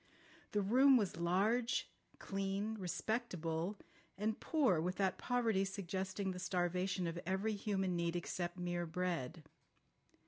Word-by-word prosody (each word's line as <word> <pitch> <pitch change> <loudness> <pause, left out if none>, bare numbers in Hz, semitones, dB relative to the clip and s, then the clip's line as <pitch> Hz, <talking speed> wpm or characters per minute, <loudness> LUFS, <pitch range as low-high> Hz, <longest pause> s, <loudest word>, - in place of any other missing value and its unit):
The 205 -1 +2
room 260 +6 +6
was 200 -7 0
large, 210 +8 +2 0.3
clean, 195 +2 -2
respectable, 180 -1 -2 0.4
and 215 +2 -1
poor 255 - +3
with 180 +3 -1
that 190 -2 0
poverty 230 -6 +2
suggesting 190 0 -2
the 180 - -5
starvation 180 0 0
of 170 0 -2
every 190 +5 0
human 195 -3 0
need 170 0 0
except 175 0 -3
mere 175 -1 -2
bread. 165 -3 -2
190 Hz, 125 wpm, -37 LUFS, 175-210 Hz, 0.4 s, room